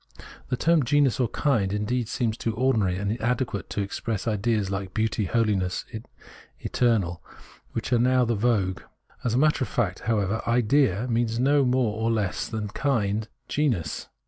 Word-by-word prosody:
The 125 - 0
term 165 +2 +3
genus 140 0 +2
or 125 - +2
kind 115 -7 +1
seems 105 - -1
indeed 115 0 -1
too 115 -1 -2
ordinary 110 -7 +1
and 100 +1 -1
inadequate 115 -2 -2
to 105 - -2
express 105 +2 -3
ideas 105 -2 0
like 95 0 -4
beauty, 110 -1 0
holiness, 100 -4 0 0.7
eternal, 100 -8 0 0.5
which - - -2
are 120 - +4
now 125 +1 +3
the 120 - 0
vogue. 100 -4 0 0.4
As 120 -2 0
a - - +2
matter 150 0 +3
of - - -3
fact, 100 -3 -1
however, 105 0 +1
idea 120 -2 +3
{l&ia) 125 - -3
means 115 -1 0
neither 140 +3 +4
more 125 -4 +1
nor 115 +1 +1
less 105 -5 -1
than 110 -3 -4
kind, 110 -4 0 0.2
genus. 125 - -1
115 Hz, 165 wpm, -25 LUFS, 100-125 Hz, 0.7 s, are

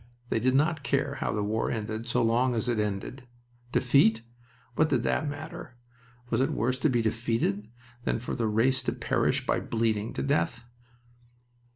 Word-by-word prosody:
They - - +1
did 130 +3 +2
not 155 +2 +2
care 140 +1 0
how - - -1
the 105 -1 -1
war 110 +2 0
ended 110 +1 -3
so 120 0 +1
long 120 +2 +2
as 115 - -1
it 120 -3 +1
ended. 105 +5 -3 0.4
Defeat? 120 -4 +4 0.5
What 155 +5 +2
did 125 -4 +1
that 150 - 0
matter? 145 -4 -8 0.5
Was - - +2
it 135 - +2
worse 125 +2 0
to 155 - +3
be 120 -3 +1
defeated 110 -2 -1 0.3
than - - 0
for 120 - -5
the 115 -3 0
race 120 +5 +2
to - - -1
perish - - 0
by - - +1
bleeding 110 -2 -1
to 65 - -3
death? 85 - 0
120 Hz, 175 wpm, -28 LUFS, 110-130 Hz, 0.5 s, Defeat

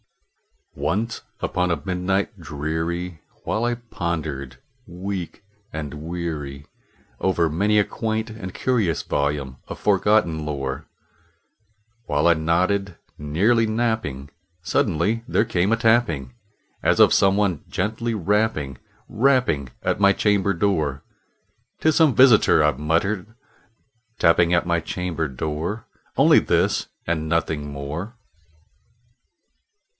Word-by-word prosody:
Once 115 +4 -2 0.2
upon 90 0 0
a 85 - 0
midnight 95 +2 -1
dreary, 80 +2 -4 0.2
while 110 +2 -1
I 120 0 0
pondered, 80 - -4 0.3
weak 90 0 -6 0.3
and 75 -2 -5
weary, 75 -3 -5 0.5
Over 85 -3 +1
many 100 +7 +2
a 105 - +5
quaint 110 +1 -3
and 100 -4 -7
curious 110 - 0
volume 70 -2 -2
of - - -7
forgotten 100 -5 +2
lore 70 -3 -4 1.2
While 75 -3 0
I 85 - +7
nodded, 90 +4 0 0.2
nearly 100 +11 +2
napping, 110 - -2 0.3
suddenly 95 +6 0
there 110 - +2
came 95 -2 +1
a 115 - +3
tapping, 110 - +2 0.5
As - - +2
of - - +7
some 95 0 +4
one 95 -7 0
gently 110 +4 -2
rapping 100 - 0 0.3
rapping 115 - +2
at - - 0
my 100 0 +5
chamber 100 -1 +2
door. 80 -7 0 0.8
"'Tis 155 -1 +2
some 155 -7 +4
visitor," 120 - +6
I 75 - +4
muttered, 90 - -1 0.8
"tapping 85 +1 +4
at 85 -1 +2
my 85 -1 +1
chamber 85 -1 -3
door 80 - -4 0.3
Only - - +6
this - - +1 0.2
and 80 -2 -2
nothing 80 -3 -1
more." 75 - -6
90 Hz, 115 wpm, -23 LUFS, 75-105 Hz, 1.2 s, I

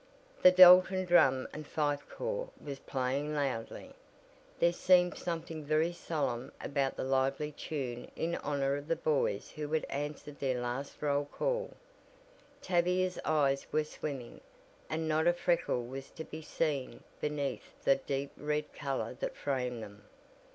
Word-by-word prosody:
The - - +10
Dalton 185 +1 +8
Drum 135 -7 +4
and 155 -1 -7
Fife 145 -2 -1
Corps - - -3
was 140 -2 -7
playing 135 +3 -2
loudly. 135 -6 -3 0.6
There 170 0 +3
seemed 180 0 +4
something 165 -2 -4
very 155 +3 +1
solemn 140 -8 -2
about 140 -1 -1
the - - -3
lively 135 +3 0
tune 130 -5 -5
in 165 +1 -1
honor 140 -1 0
of 145 +1 -8
the 165 - +1
"Boys" 145 -11 0
who 150 -1 -5
had 160 - +1
answered 145 0 -5
their 130 -3 0
last 125 +3 -4
roll 145 -1 +1
call. - - -2 0.9
Tavia's 180 +1 +1
eyes 140 -3 +2
were 155 - +2
swimming, 140 -5 -6 0.5
and 160 0 -2
not 155 +1 +2
a 175 - +6
freckle 170 -8 0
was 135 +2 -7
to 160 - -8
be 160 0 -8
seen 150 -3 -2 0.2
beneath 145 -3 -4
the 135 - +5
deep 140 +1 -3
red 150 0 -2
color 135 -5 -3
that - - -3
framed 125 -4 -2
them. 100 0 -12
145 Hz, 145 wpm, -32 LUFS, 135-165 Hz, 0.9 s, The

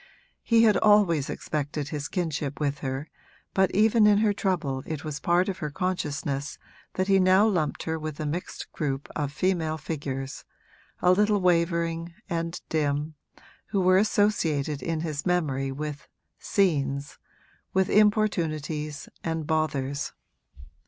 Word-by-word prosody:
He 230 -1 +4
had 215 -2 +5
always 200 -9 +4
accepted 145 -1 -3
his 150 -1 -3
kinship 155 -6 -3
with 145 -1 -1
her, 135 +2 -4 0.5
but 190 -1 +3
even 215 +1 +4
in 205 -1 +5
her 210 -1 +3
trouble 165 -10 -1
it 155 -2 -4
was 150 -2 -4
part 175 +2 +2
of 190 -2 -3
her 150 - -3
consciousness 145 -5 -2 0.4
that 185 0 0
he 195 -1 +5
now 185 +2 +5
lumped 175 -9 0
her 160 0 -2
with 155 -1 -6
a 155 - -2
mixed 165 +5 -5
group 140 -3 -3
of 145 -2 -2
female 160 -1 0
figures, 140 -4 -5 0.6
a 180 - +6
little 205 +2 +3
wavering 170 -1 +1
and 165 -2 -3
dim, 150 0 -1 0.5
who 200 - 0
were 185 0 +5
associated 165 -9 +1
in 165 -2 -2
his 155 -3 -3
memory 145 -7 0
with 150 +1 -5 0.3
'scenes,' 140 -7 0 0.5
with 190 0 +2
importunities 165 -8 +1 0.2
and 160 -1 -2
bothers. 145 -3 -1
160 Hz, 140 wpm, -26 LUFS, 145-185 Hz, 0.6 s, a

